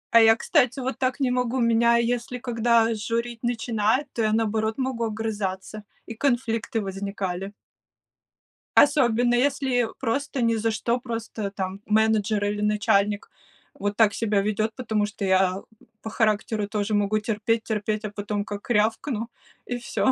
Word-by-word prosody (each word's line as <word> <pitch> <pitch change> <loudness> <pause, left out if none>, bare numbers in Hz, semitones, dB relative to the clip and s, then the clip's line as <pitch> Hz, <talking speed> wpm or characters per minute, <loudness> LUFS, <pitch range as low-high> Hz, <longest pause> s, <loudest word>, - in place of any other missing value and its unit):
А 230 - +10
я, 225 0 +7
кстати, 260 0 +1
вот 260 +1 -3
так 255 +1 0
не 260 -2 +1
могу, 250 0 0
меня, 235 0 +4
если 240 +1 -1
когда 230 -2 +2
журить 230 +2 -3
начинают, 240 +2 0
то 230 - -2
я, 215 -1 +2
наоборот, 220 0 0
могу 260 -3 -1
огрызаться, 210 -2 -4 0.2
и - - -7
конфликты 230 -2 0
возникали. 195 -1 -4 1.2
Особенно, 245 -4 +4
если 255 -2 +1
просто 275 +2 -2
ни 230 -1 +2
за 225 0 0
что, 235 +3 -1
просто 225 -4 -5
там 190 -1 -4
менеджер 215 -1 +2
или 205 0 -2
начальник 210 -1 +1 0.5
вот 205 +1 -2
так 220 -3 +5
себя 210 -2 +1
ведёт. 215 +2 0
Потому 220 -5 -1
что 210 -1 -5
я, 190 -1 +3
м, 195 - -7 0.4
по 220 - -6
характеру 215 -1 0
тоже 210 0 -2
могу 205 +1 +1
терпеть, 220 +1 -1
терпеть, 215 -1 -2
а 215 - -2
потом 205 0 -3
как 205 +4 -8
рявкну, 225 +2 0 0.4
и- - - +1
всё. 245 +2 0
225 Hz, 150 wpm, -25 LUFS, 210-240 Hz, 1.2 s, А